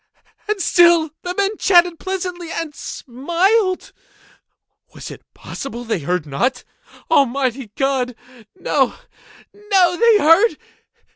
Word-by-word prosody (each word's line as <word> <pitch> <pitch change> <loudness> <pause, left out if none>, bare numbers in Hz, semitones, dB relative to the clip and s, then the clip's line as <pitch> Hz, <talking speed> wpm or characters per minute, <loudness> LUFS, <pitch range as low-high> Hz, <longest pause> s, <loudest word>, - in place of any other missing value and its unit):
And 425 -1 -1
still 340 -3 +4
the 360 0 -5
men 400 +1 0
chatted 350 -3 +3
pleasantly, 360 -3 -5
and 330 -3 -4
smiled. 360 - -1 1.0
Was - - -9
it - - -11
possible 240 -3 -7
they 225 -5 -2
heard 175 +2 -2
not? 245 - -2 0.5
Almighty 265 -4 +1
God!—no, 250 - -2 0.6
no! 385 -4 +1
They 460 0 +5
heard! 385 +6 +4
330 Hz, 100 wpm, -19 LUFS, 250-375 Hz, 1.0 s, They